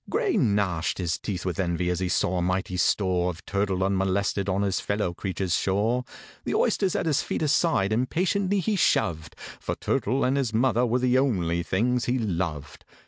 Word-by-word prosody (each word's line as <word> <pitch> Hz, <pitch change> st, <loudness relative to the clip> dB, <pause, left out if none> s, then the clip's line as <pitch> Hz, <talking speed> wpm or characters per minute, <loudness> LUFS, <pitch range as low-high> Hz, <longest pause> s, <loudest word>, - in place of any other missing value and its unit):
GRAY 425 Hz, -6 st, 0 dB
gnashed 100 Hz, -, +1 dB
his 90 Hz, -2 st, -2 dB
teeth 95 Hz, -4 st, -4 dB
with 90 Hz, +1 st, -3 dB
envy 90 Hz, -1 st, 0 dB
as 90 Hz, -, -1 dB
he 95 Hz, -1 st, -1 dB
saw 90 Hz, -1 st, +1 dB
a -, -, 0 dB
mighty 90 Hz, +1 st, -1 dB
store 90 Hz, -1 st, +1 dB
Of 90 Hz, 0 st, -8 dB
turtle 100 Hz, -2 st, -1 dB
unmolested 95 Hz, +1 st, 0 dB
on 95 Hz, +2 st, +1 dB
his 100 Hz, -2 st, 0 dB
fellow 100 Hz, -4 st, -1 dB
creature's 95 Hz, 0 st, -3 dB
shore. 110 Hz, +8 st, +1 dB, 0.4 s
The -, -, -2 dB
oysters 190 Hz, -3 st, +1 dB
at -, -, 0 dB
his 150 Hz, -4 st, +2 dB
feet -, -, -3 dB
aside 150 Hz, -, +2 dB
impatiently 185 Hz, -, 0 dB
he 215 Hz, +2 st, 0 dB
shoved, 85 Hz, -, +1 dB, 0.2 s
For -, -, -3 dB
turtle 130 Hz, +6 st, 0 dB
and 130 Hz, +2 st, +2 dB
his 125 Hz, -5 st, -1 dB
mother 120 Hz, 0 st, +2 dB
were 120 Hz, +2 st, +1 dB
the 125 Hz, 0 st, +2 dB
only 90 Hz, -11 st, 0 dB
things 120 Hz, +7 st, 0 dB
he 125 Hz, +1 st, 0 dB
loved. 85 Hz, -, -3 dB
100 Hz, 185 wpm, -26 LUFS, 90-125 Hz, 0.4 s, his